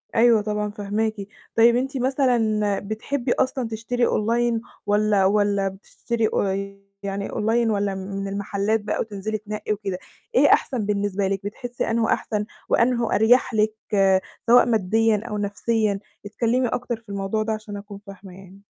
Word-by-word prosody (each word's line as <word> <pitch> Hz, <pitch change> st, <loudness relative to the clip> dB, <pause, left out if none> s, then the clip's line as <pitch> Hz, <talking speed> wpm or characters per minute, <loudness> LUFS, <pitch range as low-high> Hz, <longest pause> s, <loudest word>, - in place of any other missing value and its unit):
أيوه 230 Hz, -1 st, +5 dB
طبعًا 210 Hz, 0 st, -2 dB
فاهماكِ، 210 Hz, +2 st, -1 dB, 0.4 s
طيب 235 Hz, +1 st, +6 dB
أنتِ 265 Hz, +2 st, -1 dB
مثلًا 235 Hz, -6 st, +1 dB
بتحبّي 240 Hz, +5 st, -3 dB
أصلًا 260 Hz, -2 st, 0 dB
تشتري 230 Hz, +2 st, -1 dB
أونلاين 230 Hz, +1 st, +1 dB, 0.2 s
والّا 205 Hz, -1 st, +3 dB
والّا 200 Hz, 0 st, +2 dB
بتشتري 220 Hz, +4 st, -3 dB
أ 195 Hz, 0 st, -1 dB, 0.3 s
يعني 200 Hz, 0 st, -3 dB
أونلاين 225 Hz, +1 st, +1 dB
والّا 200 Hz, -1 st, 0 dB
من 195 Hz, +1 st, -5 dB
المحلات 200 Hz, +2 st, -1 dB
بقى 205 Hz, -, -2 dB
وتنزلي 215 Hz, 0 st, -3 dB
تنقّي 210 Hz, 0 st, -4 dB
وكده، 195 Hz, -3 st, -4 dB, 0.4 s
إيه -, -, +6 dB
أحسن 240 Hz, -7 st, 0 dB
بالنسبة 200 Hz, -1 st, 0 dB
لِك 195 Hz, -1 st, -1 dB
بتحسي 240 Hz, +4 st, -4 dB
أنهو 225 Hz, 0 st, +1 dB
أحسن 210 Hz, -1 st, -1 dB, 0.2 s
وأنهو 235 Hz, -1 st, +2 dB
أريح 240 Hz, +4 st, +4 dB
لِك 215 Hz, 0 st, +2 dB, 0.2 s
آآ، 190 Hz, -1 st, +4 dB, 0.3 s
سواء 240 Hz, +2 st, +7 dB
ماديًا 220 Hz, 0 st, +2 dB
أو 210 Hz, -, -3 dB
نفسيًا؟ 205 Hz, 0 st, 0 dB, 0.3 s
اتكلمي 235 Hz, +4 st, 0 dB
أكتر 240 Hz, 0 st, -2 dB
في 225 Hz, -1 st, -22 dB
الموضوع 200 Hz, +2 st, -1 dB
ده 220 Hz, -, -1 dB
عشان 215 Hz, -1 st, -6 dB
أكون 200 Hz, 0 st, -9 dB
فاهمة 195 Hz, -1 st, -11 dB
يعني. 195 Hz, +1 st, -15 dB
215 Hz, 150 wpm, -23 LUFS, 200-230 Hz, 0.4 s, سواء